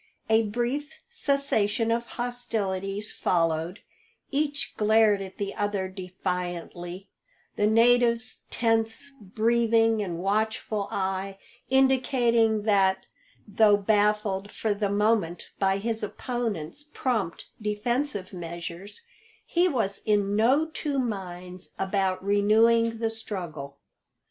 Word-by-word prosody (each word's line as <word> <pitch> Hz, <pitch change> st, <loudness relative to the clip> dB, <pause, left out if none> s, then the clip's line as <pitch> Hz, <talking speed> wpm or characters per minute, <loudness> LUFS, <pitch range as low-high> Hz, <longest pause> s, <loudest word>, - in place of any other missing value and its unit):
A 220 Hz, +1 st, +6 dB
brief 245 Hz, +7 st, -3 dB
cessation 260 Hz, -, +1 dB
of 235 Hz, +1 st, 0 dB
hostilities 210 Hz, -5 st, -2 dB
followed; 165 Hz, +2 st, 0 dB, 0.5 s
each 290 Hz, 0 st, -1 dB
glared 215 Hz, -1 st, +4 dB
at 190 Hz, -1 st, -8 dB
the 200 Hz, -1 st, -3 dB
other 205 Hz, -2 st, -1 dB
defiantly, 180 Hz, -1 st, -5 dB, 0.5 s
the 210 Hz, -, +2 dB
native's 235 Hz, +1 st, +3 dB
tense 225 Hz, +3 st, 0 dB
breathing 225 Hz, +2 st, +2 dB
and 175 Hz, -4 st, -3 dB
watchful 210 Hz, +2 st, -1 dB
eye 195 Hz, 0 st, -2 dB, 0.3 s
indicating 245 Hz, -4 st, +3 dB
that, 190 Hz, -3 st, +2 dB, 0.4 s
though 210 Hz, 0 st, +5 dB
baffled 205 Hz, -1 st, +1 dB
for 220 Hz, -2 st, -1 dB
the 205 Hz, 0 st, -1 dB
moment 205 Hz, -4 st, 0 dB
by 195 Hz, -1 st, +2 dB
his 225 Hz, +2 st, -1 dB
opponents 220 Hz, -, -3 dB
prompt 220 Hz, -10 st, -1 dB, 0.2 s
defensive 210 Hz, 0 st, -2 dB
measures, 175 Hz, -, -7 dB, 0.4 s
he 355 Hz, +1 st, +2 dB
was 220 Hz, -, -1 dB
in 205 Hz, -1 st, +1 dB
no 255 Hz, +9 st, +4 dB
two 305 Hz, -2 st, -3 dB
minds 185 Hz, -6 st, -5 dB
about 190 Hz, -1 st, -1 dB
renewing 225 Hz, +3 st, +4 dB
the 225 Hz, 0 st, -1 dB
struggle. 170 Hz, -11 st, -6 dB
210 Hz, 105 wpm, -27 LUFS, 190-230 Hz, 0.5 s, A